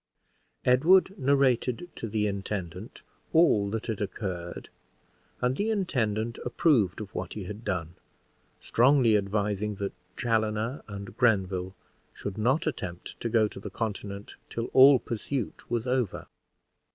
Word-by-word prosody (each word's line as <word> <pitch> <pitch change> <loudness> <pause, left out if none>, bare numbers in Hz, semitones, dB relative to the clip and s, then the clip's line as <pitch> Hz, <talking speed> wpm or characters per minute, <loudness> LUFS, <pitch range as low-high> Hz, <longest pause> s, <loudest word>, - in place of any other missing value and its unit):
Edward 175 +10 +5
narrated 130 +1 +2
to 115 - -5
the 105 0 0
intendant 95 -1 -4 0.3
all 150 -12 +4
that 110 +1 -3
had 110 -3 -3
occurred, 95 -4 -5 0.7
and 125 +1 +1
the 205 +7 -1
intendant 120 - -1
approved 120 - +2
of 105 -2 -7
what - - -4
he 105 - -5
had 105 +4 -7
done, 85 -5 -2 0.7
strongly 125 -2 +4
advising 105 0 0
that 100 0 -4 0.2
Chaloner 110 +2 0
and 100 -1 -8
Grenville 95 -6 +1 0.4
should 100 +1 -5
not 130 +9 +2
attempt 90 - -5
to 115 - -2
go 110 -1 +3
to 100 - -9
the - - -7
Continent 100 -2 -5 0.2
till 115 0 -4
all 135 +1 +9
pursuit 120 +1 -4
was 120 -1 -1
over. 125 -5 -1
110 Hz, 130 wpm, -28 LUFS, 100-125 Hz, 0.7 s, all